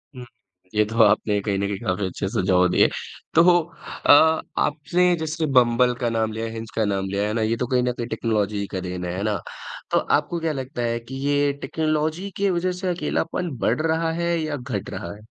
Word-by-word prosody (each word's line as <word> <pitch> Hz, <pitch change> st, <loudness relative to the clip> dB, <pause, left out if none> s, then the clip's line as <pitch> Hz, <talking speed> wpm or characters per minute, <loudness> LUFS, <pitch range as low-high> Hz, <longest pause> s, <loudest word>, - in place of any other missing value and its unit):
हुँ, 125 Hz, -, -8 dB, 0.5 s
ये 105 Hz, -, +5 dB
तो 115 Hz, +2 st, +1 dB
आपने 105 Hz, 0 st, +3 dB
कहीं 100 Hz, -1 st, -1 dB
न 100 Hz, -, 0 dB
कहीं 100 Hz, -1 st, -3 dB
काफ़ी 95 Hz, -2 st, -1 dB
अच्छे 95 Hz, +1 st, -3 dB
सुझाव 90 Hz, -1 st, +2 dB
दिए। -, -, +4 dB, 0.5 s
तो 165 Hz, -, +7 dB, 0.6 s
अ, -, -, +7 dB, 0.5 s
आपने 175 Hz, +4 st, +2 dB
जैसे 160 Hz, 0 st, -2 dB
बम्बल 125 Hz, 0 st, +4 dB
का 120 Hz, -, +1 dB
नाम 110 Hz, -1 st, 0 dB
लिया 110 Hz, +1 st, -3 dB
है, 110 Hz, -, -5 dB
हिंज 115 Hz, 0 st, -7 dB
का 110 Hz, -, +1 dB
नाम 95 Hz, -1 st, -1 dB
लिया 100 Hz, +1 st, -1 dB
है 105 Hz, -, -2 dB
ना, 115 Hz, -, 0 dB
ये 110 Hz, +1 st, 0 dB
तो 125 Hz, -, -2 dB
कहीं 125 Hz, -1 st, +1 dB
न 125 Hz, -, +1 dB
कहीं 120 Hz, -1 st, -5 dB
टेक्नोलॉजी 105 Hz, -3 st, -1 dB
ही 100 Hz, -, -3 dB
का 95 Hz, -, -1 dB
देन 90 Hz, -1 st, -5 dB
है, 90 Hz, +1 st, -3 dB
है 100 Hz, -, -2 dB
ना? 105 Hz, -2 st, 0 dB, 0.5 s
तो -, -, +3 dB
आपको 170 Hz, -, 0 dB
क्या 160 Hz, -1 st, -1 dB
लगता 130 Hz, -2 st, -5 dB
है 115 Hz, 0 st, -1 dB
कि 125 Hz, +3 st, -10 dB
ये 145 Hz, 0 st, +2 dB
टेक्नोलॉजी 155 Hz, +4 st, -1 dB
के 200 Hz, 0 st, +2 dB
वजह 180 Hz, +1 st, 0 dB
से 185 Hz, -, -2 dB
अकेलापन 175 Hz, 0 st, -2 dB
बढ़ 120 Hz, +6 st, 0 dB
रहा 160 Hz, 0 st, 0 dB
है, 170 Hz, 0 st, 0 dB
या 155 Hz, -2 st, -2 dB
घट 125 Hz, -6 st, -5 dB
रहा 85 Hz, -, -6 dB
है? 105 Hz, -, -15 dB
120 Hz, 225 wpm, -23 LUFS, 105-155 Hz, 0.6 s, तो